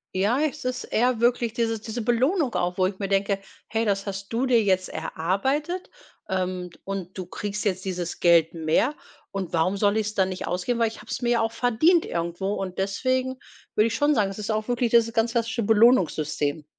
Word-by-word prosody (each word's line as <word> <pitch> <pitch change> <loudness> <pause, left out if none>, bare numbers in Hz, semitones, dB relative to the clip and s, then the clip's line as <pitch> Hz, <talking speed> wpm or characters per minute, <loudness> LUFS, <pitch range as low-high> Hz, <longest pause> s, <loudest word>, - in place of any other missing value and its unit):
Ja, 215 +9 +2
es 300 -3 -2
ist 255 0 -2
eher 245 0 +1
wirklich 235 -1 +2
diese 225 -2 0
diese 225 +1 -5
Belohnung 255 - +1
auch, 180 +1 -1
wo 185 - +4
ich 190 -1 -5
mir 195 - -3
denke: 195 0 +1 0.3
„Hey, 225 +1 -1
das 200 0 0
hast 195 +2 -6
du 255 +3 +1
dir 240 -2 +5
jetzt 185 -2 +1
erarbeitet, 265 - -2 0.4
ähm, 185 -1 -2
und 195 -2 -5
du 185 -2 -6
kriegst 205 +3 -4
jetzt 190 -2 -1
dieses 180 -2 -4
Geld 170 -1 +4
mehr 165 - +1 0.3
und 190 -3 -5
warum 180 +4 +1
soll 205 +1 +2
ich's 215 0 -1
dann 190 -1 +2
nicht 185 -2 -5
ausgeben, 180 +8 -1
weil 230 - +3
ich 220 - -7
habe - - -11
es - - -3
mir 240 - 0
ja 235 -1 +3
auch 225 0 0
verdient 245 +9 +3
irgendwo.“ 170 +4 -2
Und 190 -1 -5
deswegen 255 +6 0 0.4
würde 215 - +4
ich 225 - -3
schon 290 0 +3
sagen, 200 -2 +2
es 195 - -8
ist 210 - -5
auch 215 +1 -1
wirklich 245 -1 +1
dieses 230 -1 +3
ganz 225 +1 +1
klassische 230 0 0
Belohnungssystem. 175 - +2
210 Hz, 205 wpm, -25 LUFS, 185-240 Hz, 0.4 s, dir